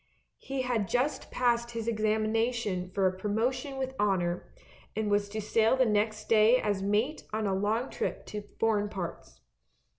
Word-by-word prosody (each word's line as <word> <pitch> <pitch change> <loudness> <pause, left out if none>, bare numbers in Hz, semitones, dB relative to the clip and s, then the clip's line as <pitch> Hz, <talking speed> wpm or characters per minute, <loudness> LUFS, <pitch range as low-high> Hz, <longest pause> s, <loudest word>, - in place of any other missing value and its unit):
He 270 -1 -3
had 235 -5 0
just 250 +7 0
passed 235 -1 +1
his 230 -1 -4
examination 215 -3 0
for 190 0 +2
pro 185 +3 -5
motion 260 +5 -1
with 265 0 -2
honour, 180 -4 0 0.4
and 215 -1 -1
was 205 0 +2
to 215 +1 -4
sail 225 +3 +2
next 215 0 0
day 225 +2 +6
as 205 -4 0
mate 210 +9 0
on 215 0 -1
a 195 - +1
long 215 +6 0
trip - - -3
to 210 - -5 0.2
foreign 210 -2 +2
parts. 170 - -7
215 Hz, 155 wpm, -30 LUFS, 205-235 Hz, 0.4 s, day